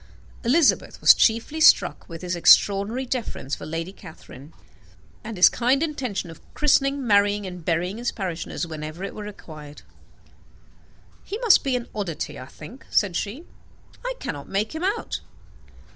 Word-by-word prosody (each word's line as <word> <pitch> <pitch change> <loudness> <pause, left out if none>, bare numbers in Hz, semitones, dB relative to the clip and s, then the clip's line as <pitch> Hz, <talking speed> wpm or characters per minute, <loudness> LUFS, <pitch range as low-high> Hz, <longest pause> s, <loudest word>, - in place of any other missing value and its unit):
Elizabeth 280 +6 +2
was - - +8
chiefly 230 +8 +1
struck - - +4
with 165 +1 -9
his 180 0 -2
extraordinary 200 +8 +4
deference 235 - -4
for - - -4
Lady 165 +4 -4
Catherine, 150 -4 -13 0.7
and 220 -2 -7
his 180 - +8
kind 260 +5 +1
intention 255 - -3
of 165 - -14
christening, 275 -2 +2
marrying, 205 -1 +3
and 180 -2 -8
burying 180 +6 -1
his 240 - -1
parishioners 175 -3 -4
whenever 155 +2 -7
it - - -5
were 215 - -8
required. 155 -7 -11 1.4
"He 410 - -5
must 465 -6 +5
be 270 -2 0
an 245 -1 -3
oddity, 170 -7 -4
I 130 - -9
think," 205 - -13
said 195 -5 +1
she. 225 - -4 0.6
"I - - -3
cannot 145 -2 -6
make 205 +5 -1
him 320 +2 -5
out. 410 +4 -2
205 Hz, 150 wpm, -24 LUFS, 170-260 Hz, 1.4 s, was